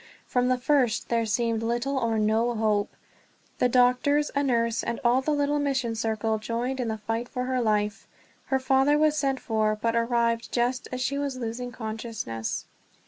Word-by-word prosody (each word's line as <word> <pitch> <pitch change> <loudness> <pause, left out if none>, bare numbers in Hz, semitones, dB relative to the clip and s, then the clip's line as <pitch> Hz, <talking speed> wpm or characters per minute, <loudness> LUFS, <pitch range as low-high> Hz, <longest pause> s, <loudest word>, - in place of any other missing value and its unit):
From 250 -1 +1
the 255 0 +2
first 250 -3 +1
there 230 -1 +1
seemed 230 +1 0
little 240 +4 -1
or 230 -2 0
no 220 +3 +1
hope. 215 -2 0 0.6
The 250 - +3
doctors, 255 +4 +3
a 280 - +2
nurse, 230 -4 +1
and 235 - -3
all 245 +2 +4
the 270 - -3
little 290 0 +1
mission 265 -5 0
circle 220 -1 -1
joined 235 +4 -3
in 245 - -1
the 220 0 -2
fight 225 +3 -3
for 250 - -3
her 255 0 0
life. 210 -2 0 0.4
Her 265 - +1
father 270 +2 +3
was 305 0 +3
sent 270 -3 0
for, 215 -2 0
but 230 +1 0
arrived 235 0 +1
just 245 +1 0
as 255 0 -3
she 280 +2 -1
was 280 -2 -2
losing 245 +1 -4
consciousness. 220 - -4
240 Hz, 180 wpm, -26 LUFS, 225-260 Hz, 0.6 s, all